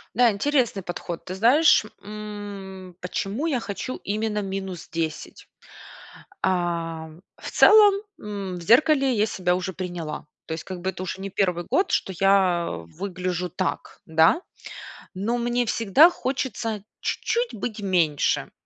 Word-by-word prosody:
Да, 245 0 +6
интересный 235 -3 0
подход. 175 -1 -6
Ты 185 - -5
знаешь, 245 +6 +5 0.2
м, 200 -3 -8
почему 205 - -3
я 270 -7 +1
хочу 220 +5 -5
именно 210 +1 -1
минус 190 -2 -5
10? 160 -2 -4 0.9
А, 170 -3 -1 0.3
в - - -8
целом, 420 -2 +7 0.3
м, 200 -3 -5
в 175 - -8
зеркале 270 - +4
я 215 -2 +2
себя 180 -3 0
уже 185 0 -3
приняла. 175 -4 -5 0.2
То 160 - -3
есть, 160 - -5
как 185 -2 -7
бы, 190 - -1
это 185 - -5
уже 185 +1 -5
не 195 - -4
1 180 -3 0
год, 385 - +2
что 190 - 0
я 190 -3 +3
выгляжу 180 - -4
так, 185 +2 -4
да? 160 - +4 0.7
Но 215 +6 -1
мне 240 0 0
всегда 230 - +5
хочется 255 - -3 0.2
чуть-чуть 475 +1 -1
быть 215 0 -5
меньше. 170 -7 +1
195 Hz, 140 wpm, -24 LUFS, 180-225 Hz, 0.9 s, целом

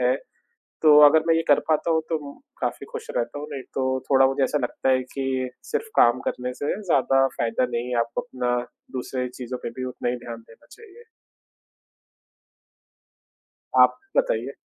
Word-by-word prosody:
है। 125 +1 +3 0.7
तो 150 -2 +7
अगर 155 +2 +5
मैं 165 - +5
ये 165 - +2
कर 145 - +5
पाता 155 +2 +1
हूँ 160 - +3
तो 165 - 0 0.2
अम, - - -19 0.2
काफ़ी - - -3
खुश 465 -1 -6
रहता 145 - -2
हूँ, 150 - -6
नहीं 135 -2 -5
तो 130 -1 0 0.2
थोड़ा 135 -1 +6
मुझे 135 +1 0
ऐसा 150 - 0
लगता 125 +2 -1
है 130 - +3
कि 130 -2 -2 0.2
सिर्फ़ 455 -1 -1
काम 120 +2 +5
करने 125 0 -4
से 145 - 0
ज़्यादा 135 -4 +3
फ़ायदा 115 +2 0
नहीं 120 +1 -2
है, 125 -1 -1
आप 115 0 -1
अपना 125 -5 -1 0.4
दूसरे 125 0 -3
चीज़ों 125 0 -7
पे - - -4
भी - - -2
उतना 125 -1 -4
ही 125 - -2
ध्यान 115 -1 -6
देना 115 - -19
चाहिए। 450 +1 -15 2.7
आप - - +6 0.2
बताइए। - - +1
135 Hz, 175 wpm, -24 LUFS, 125-155 Hz, 2.7 s, तो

